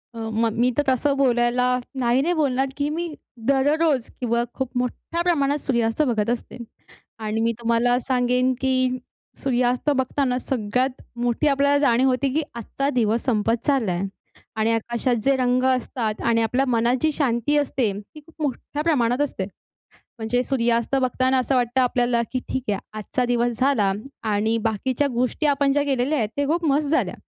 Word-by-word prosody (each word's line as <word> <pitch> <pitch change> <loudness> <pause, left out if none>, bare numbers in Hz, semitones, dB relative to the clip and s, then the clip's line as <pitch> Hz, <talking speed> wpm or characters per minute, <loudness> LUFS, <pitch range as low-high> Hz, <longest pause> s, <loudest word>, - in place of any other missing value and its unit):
अ, - - -9 0.3
मग 225 -2 +1
मी 245 +1 +4
तर 290 - +3
तसं 270 +2 +2
बोलायला 245 -2 +2 0.4
नाही, 240 +2 +3
नाही 340 +5 +1
बोलणार 270 -5 +1
की 285 0 0
मी 335 +3 -2 0.4
दररोज 285 -1 +2
किंवा 235 -1 +1
खूप 265 -2 -3
मोठ्या 250 +7 -2
प्रमाणात 290 -5 +1
सूर्यास्त 235 0 +1
बघत 230 -7 +1
असते. 240 0 -3 0.6
आणि 220 0 -2
मी 230 +1 +2
तुम्हाला 235 +1 +2
सांगेन 250 0 +1
की 255 -1 +1 0.4
सूर्यास्त 250 +1 +1
बघताना 260 -1 0
सगळ्यात 250 +1 -1 0.2
मोठी 245 +5 +1
आपल्याला 280 0 +3
जाणीव 265 -2 +3
होती 255 +1 +1
की 315 - +1
आजचा 240 +4 -3
दिवस 230 -3 +1
संपत 225 -1 0
चालला 265 -10 +2
आहे. 175 +3 -2 0.5
आणि 220 +1 +1
आकाशात 235 +2 0
जे 275 0 +3
रंग 250 0 +1
असतात 245 -4 -1
आणि 230 -1 +3
आपल्या 250 +4 +1
मनात 235 +1 +2
जी 315 -1 +2
शांती 270 -1 0
असते, 260 -6 0
ती 260 +9 -15
खूप 330 -1 -11
मोठ्या 290 +1 -3
प्रमाणात 255 -6 +1
असते. 285 -9 -1 0.7
म्हणजे 230 +2 0
सूर्यास्त 235 -1 0
बघताना 255 +1 +1
असं 255 +2 0
वाटतं 250 0 +1
आपल्याला 245 -1 +2
की 255 - 0
ठीक 260 - -2
आहे 200 - 0 0.2
आजचा 250 +4 -2
दिवस 240 -1 0
झाला 245 -8 +3 0.4
आणि 220 +2 +1
बाकीच्या 245 +6 0
गोष्टी 250 +5 0
आपण 280 -1 +2
ज्या 290 +1 +2
केलेल्या 275 +2 0
आहेत, 220 -4 0
त्या 285 0 0
खूप 335 +4 0
मस्त 290 +2 +1
झाल्या. 315 +3 +1
250 Hz, 165 wpm, -23 LUFS, 235-275 Hz, 0.7 s, मी